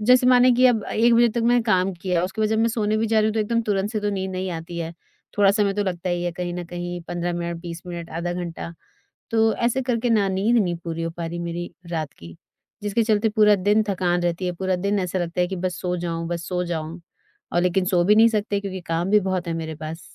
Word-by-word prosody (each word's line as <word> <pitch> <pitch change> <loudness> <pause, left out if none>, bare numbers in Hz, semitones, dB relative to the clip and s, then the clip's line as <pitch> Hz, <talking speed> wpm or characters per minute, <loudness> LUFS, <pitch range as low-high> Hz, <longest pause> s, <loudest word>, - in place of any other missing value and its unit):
जैसे 250 +3 +5
माने 250 0 +6
कि 250 +2 +5
अब 225 -4 +2
अ, - - -7
1:00 235 +2 +4
बजे 235 0 +5
तक 235 +2 -2
मैंने 240 +1 +3
काम 195 -4 +2
किया, 175 -1 -1
उसके 190 +4 -5
बाद 215 - +2
जब 220 - +1
मैं 225 +1 +3
सोने 215 -2 0
भी 225 +1 +1
जा 220 0 +2
रही 215 - +2
हूँ 215 - -2
तो 220 - +1
एकदम 230 +2 +1
तुरंत 205 -2 -1
से 215 -2 -2
तो 205 0 0
नींद 190 -1 -3
नहीं 185 0 -3
आती 170 0 -6
है, 165 0 -4 0.5
थोड़ा 200 -1 +6
समय 200 -1 +2
तो 205 - 0
लगता 180 -1 -3
ही 175 0 -1
है 175 - -1
कहीं 175 0 -4
न 180 0 -4
कहीं 175 0 -5
15 175 0 -2
मिनट, 170 0 -3
20 170 -1 -7
मिनट, 170 -1 -6
आधा 170 +2 -3
घंटा। 175 -1 -5 0.6
तो 225 -1 +3
ऐसे 240 +2 0
करके 245 -1 0
ना 205 -4 +3
नींद 200 +6 +1
नहीं 180 -6 +2
पूरी 165 -1 -4
हो 165 - -2
पा 170 -1 -3
रही 170 +1 -5
मेरी 170 0 -4 0.2
रात 160 -4 -3
की, 85 0 -11 0.5
जिसके 205 +3 +1
चलते 215 0 +2
पूरा 210 -1 +5
दिन 205 +3 +3
थकान 180 -2 0
रहती 175 +1 -1
है, 180 - -1
पूरा 185 +1 -1
दिन 200 +3 0
ऐसा 185 0 -2
लगता 175 0 -2
है 180 - +3
कि 190 - -4
बस 180 -1 -3
सो 180 0 -1
जाऊँ 170 -1 -3
बस 170 -2 -4
सो 180 -1 -1
जाऊँ, 165 0 -4 0.5
और 175 - +2
लेकिन 180 +1 +2
सो 180 -1 +2
भी 205 +4 +5
नहीं 225 +1 +7
सकते 210 -2 -1
क्योंकि 190 -2 -5
काम 165 +3 -1
भी 210 0 +5
बहुत 185 -1 -1
है 165 - -1
मेरे 160 0 -5
पास। 160 +2 -5
185 Hz, 265 wpm, -23 LUFS, 175-215 Hz, 0.6 s, नहीं